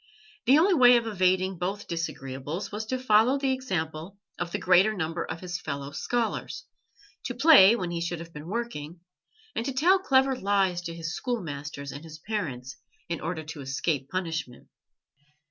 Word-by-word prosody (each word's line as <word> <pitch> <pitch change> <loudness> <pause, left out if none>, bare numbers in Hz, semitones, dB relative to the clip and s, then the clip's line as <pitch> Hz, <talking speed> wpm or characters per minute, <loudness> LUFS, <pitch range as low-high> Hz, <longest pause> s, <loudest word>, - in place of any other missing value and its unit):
The 270 +4 +7
only 370 +5 +4
way 250 -6 +7
of 235 - -1
evading 185 -3 +1
both 195 +4 -3
disagreeables 150 0 -4
was 215 +1 -5
to 255 - -1
follow 250 +1 +4
the 275 -1 0
example 185 -8 -3 0.2
of 170 - -3
the - - -1
greater 185 +4 +4
number 165 -2 -2
of 160 +1 -6
his 175 -3 -5
fellow 140 -1 -5
scholars 240 - -2 0.6
to 245 - -3
play 250 - +8
when 180 -6 -3
he 170 -1 -3
should 170 +1 -2
have 165 0 -10
been 150 +1 -9
working, 180 -7 -5 0.5
and - - -1
to 270 +2 -3
tell 350 +9 +4
clever 270 -6 +3
lies 195 -5 +1
to 165 -1 -5
his 165 0 -4
schoolmasters 150 - -4
and 145 - -9
his 160 -1 -10
parents 140 - -4 0.3
in 170 - -3
order 165 0 -3
to 155 -1 -8
escape 135 +1 -2
punishment. 160 -9 -4
180 Hz, 170 wpm, -27 LUFS, 160-235 Hz, 0.6 s, play